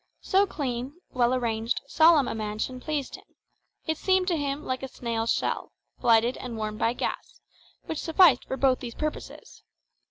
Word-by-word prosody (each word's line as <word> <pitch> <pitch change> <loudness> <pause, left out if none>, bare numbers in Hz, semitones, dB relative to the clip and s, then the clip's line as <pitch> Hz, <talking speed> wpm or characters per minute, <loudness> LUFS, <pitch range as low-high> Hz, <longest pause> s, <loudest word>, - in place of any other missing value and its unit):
So 395 +2 +3
clean, 260 -4 -4 0.2
well 245 -1 +2
arranged, 230 -2 0
solemn 315 -1 +5
a - - -2
mansion 215 +3 -4
pleased 290 0 -3
him; - - -18 0.6
it 315 -1 -2
seemed 375 -1 +2
to 345 - +2
him 290 -1 -3
like 255 0 -2
a 265 - -4
snail's 230 -3 -2
shell, - - -2 0.3
lighted 230 +2 +4
and 240 -3 -6
warmed 215 -1 -4
by 230 - +2
gas, - - -5 0.5
which - - -4
sufficed 325 -5 +5
for 265 - -4
both 265 -2 +3
these 235 -2 -7
purposes. 305 0 -6
255 Hz, 165 wpm, -27 LUFS, 230-300 Hz, 0.6 s, solemn